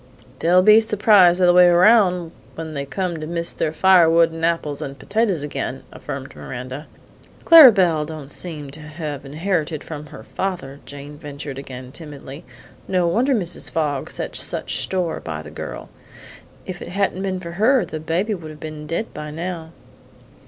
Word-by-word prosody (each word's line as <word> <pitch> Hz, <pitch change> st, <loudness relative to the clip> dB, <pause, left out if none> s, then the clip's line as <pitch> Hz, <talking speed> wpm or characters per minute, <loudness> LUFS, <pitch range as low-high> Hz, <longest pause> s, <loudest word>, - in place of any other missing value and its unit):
"They'll 180 Hz, +2 st, +4 dB
be 215 Hz, +2 st, +7 dB
surprised 205 Hz, -5 st, +4 dB
the -, -, +2 dB
other 175 Hz, 0 st, +5 dB
way 180 Hz, 0 st, +7 dB
round 180 Hz, -2 st, +4 dB, 0.2 s
when 160 Hz, -1 st, -6 dB
they 140 Hz, -1 st, -4 dB
come 180 Hz, +1 st, -3 dB
to 155 Hz, -, -6 dB
miss 170 Hz, 0 st, -1 dB
their 155 Hz, -, -1 dB
firewood 170 Hz, -1 st, +5 dB
and 165 Hz, 0 st, -8 dB
apples 165 Hz, -4 st, -1 dB
and 140 Hz, 0 st, -6 dB
potatoes 200 Hz, -, -1 dB
again," 145 Hz, -, -5 dB
affirmed -, -, -8 dB
Miranda. 125 Hz, -, -7 dB, 0.6 s
"Clara 320 Hz, -7 st, +10 dB
Belle 175 Hz, -7 st, +2 dB
don't 150 Hz, -3 st, -8 dB
seem 150 Hz, -5 st, -3 dB
to 150 Hz, -, -10 dB
have 150 Hz, -2 st, -7 dB
inherited 155 Hz, 0 st, -2 dB
from 150 Hz, -2 st, -8 dB
her 150 Hz, -, -11 dB
father," 155 Hz, -8 st, -5 dB
Jane 145 Hz, +1 st, -10 dB
ventured 140 Hz, -2 st, -7 dB
again 130 Hz, -2 st, -9 dB
timidly. 145 Hz, -2 st, -9 dB, 0.4 s
"No 180 Hz, -2 st, +1 dB
wonder 245 Hz, +11 st, +2 dB
Mrs. 180 Hz, -6 st, -2 dB
Fogg 145 Hz, -4 st, -2 dB
sets -, -, -2 dB
such -, -, -2 dB
store 180 Hz, -3 st, -2 dB
by 80 Hz, -2 st, -6 dB
the 75 Hz, -, -11 dB
girl. -, -, -8 dB, 0.7 s
If 180 Hz, -1 st, -7 dB
it -, -, -7 dB
hadn't 190 Hz, +1 st, -1 dB
been 190 Hz, -1 st, -2 dB
for 170 Hz, -2 st, -8 dB
her, 220 Hz, +5 st, +2 dB
the 155 Hz, -1 st, -6 dB
baby 175 Hz, +7 st, -1 dB
would 165 Hz, -5 st, -7 dB
have 155 Hz, -1 st, -11 dB
been 155 Hz, -1 st, -8 dB
dead 170 Hz, +8 st, -3 dB
by 150 Hz, 0 st, -7 dB
now." 165 Hz, +1 st, -6 dB
165 Hz, 175 wpm, -21 LUFS, 150-185 Hz, 0.7 s, Clara